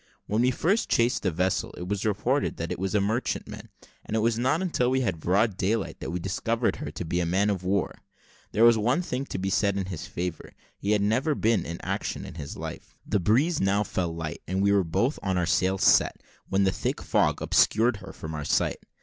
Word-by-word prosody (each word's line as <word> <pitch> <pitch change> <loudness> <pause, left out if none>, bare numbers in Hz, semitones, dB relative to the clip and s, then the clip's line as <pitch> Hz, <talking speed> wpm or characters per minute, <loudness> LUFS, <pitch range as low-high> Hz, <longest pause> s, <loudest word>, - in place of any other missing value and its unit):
When 105 +3 0
we 125 - +4
first 175 - +1
chased 120 +2 +2
the 95 - +1
vessel, 90 +3 -1
it 90 - -6
was 100 +2 -1
reported 120 +7 0
that 85 - -4
it - - -3
was 95 +2 -2
a - - +5
merchantman; 110 +5 -2 0.3
and 110 - -2
it - - +1
was 115 0 +1
not 130 +6 +2
until 125 -9 +1
we 130 +1 +1
had 95 -10 -1
broad 95 +4 +1
daylight 100 +3 -1
that - - -5
we 90 +2 -2
discovered 115 +6 -1
her - - -5
to - - -6
be 90 +2 -1
a 85 - +1
man 100 +4 +2
of 95 -3 -3
war. 95 +1 -1 0.5
There 110 - +2
was 115 -1 +7
one 125 +11 +1
thing 135 -5 -3
to - - -4
be 95 +1 -2
said 100 0 +2
in 95 - -1
his 80 - -6
favour 90 -1 -5 0.2
he 100 +2 0
had 105 -1 +2
never 125 +9 +1
been 115 -2 +1
in 85 +1 -5
action - - -3
in - - -8
his 75 -3 -7
life. - - -8
The 105 - +1
breeze 130 - +2
now 100 +2 +2
fell 90 -4 -2
light, 80 0 -5
and 95 +2 0
we 100 - +4
were 100 -1 +4
both 115 - 0
with 95 -2 -1
our 90 - +1
sails 95 +2 +1
set, - - +4 0.3
when 95 0 +2
a 95 - +3
thick - - -2
fog - - +1
obscured 115 +1 +3
her - - -10
from 80 0 -7
our 75 -1 -4
sight. 75 - +1
100 Hz, 235 wpm, -27 LUFS, 90-115 Hz, 0.5 s, was